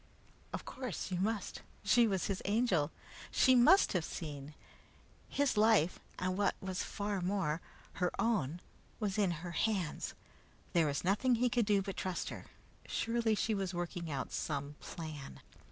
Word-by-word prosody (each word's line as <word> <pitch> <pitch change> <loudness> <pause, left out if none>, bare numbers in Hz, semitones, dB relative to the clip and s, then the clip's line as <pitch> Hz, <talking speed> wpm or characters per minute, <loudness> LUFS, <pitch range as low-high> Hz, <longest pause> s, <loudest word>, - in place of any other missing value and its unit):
Of - - -5
course 250 -7 -4
you 180 - 0
must! 210 0 -1 0.2
She 230 +3 +5
was 190 -4 0
his 195 -2 -2
Angel. 200 -8 +2 0.4
She 260 - +5
must 255 +11 +6
have 180 -4 +1
seen! 150 -3 -6 0.7
His 280 -5 +1
life, 210 -6 +4 0.2
and 185 0 -1
what 200 0 +2
was 190 -1 -3
far 205 -2 -2
more, 175 -4 0 0.4
her 180 - +4
own, 190 - +1 0.4
was 210 -2 -1
in 200 -3 +4 0.2
her 175 - -4
hands. 185 -2 -1 0.6
There 165 -3 +4
was 140 -1 -1
nothing 210 +7 +3
he 245 +2 +2
could 230 -1 +1
do 200 -2 +3
but 195 -1 -5
trust 185 -2 -2
her. - - -8 0.4
Surely 230 -1 +1
she 220 +1 +1
was 190 -3 -2
working 175 -1 -3
out 140 -3 -3
some 145 -1 -2
plan. 155 -4 -7
195 Hz, 155 wpm, -34 LUFS, 170-220 Hz, 0.7 s, must